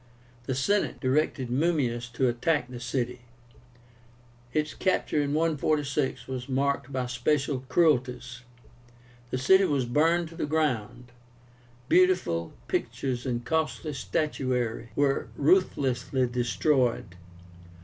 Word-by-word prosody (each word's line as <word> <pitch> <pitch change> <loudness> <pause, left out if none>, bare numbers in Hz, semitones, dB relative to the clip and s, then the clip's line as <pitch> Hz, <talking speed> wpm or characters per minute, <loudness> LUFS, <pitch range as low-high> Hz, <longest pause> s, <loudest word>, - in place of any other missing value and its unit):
The 130 - -1
Senate 200 +11 0
directed 130 -1 0
Mummius 125 -5 0
to 130 +2 +1
attack 125 +3 0
the 125 - -7
city. 125 0 -3 1.3
Its 155 +3 -1
capture 185 -5 0
in 145 0 -1
146 150 -3 0
was 130 0 -5
marked 140 +1 0
by 130 -1 -1
special 135 +3 0
cruelties. 125 -6 +1 0.9
The 130 - -2
city 190 +9 +5
was 140 -6 +1
burned 160 +7 +2
to 165 - -13
the 165 - -2
ground; 125 -6 -1 0.8
beautiful 180 - +2 0.2
pictures 130 -1 -2
and 120 -1 -2
costly 160 +1 -1
statuary 125 -5 -2
were 140 -1 +1
ruthlessly 135 -6 +2
destroyed. 125 - 0
135 Hz, 110 wpm, -27 LUFS, 125-155 Hz, 1.3 s, city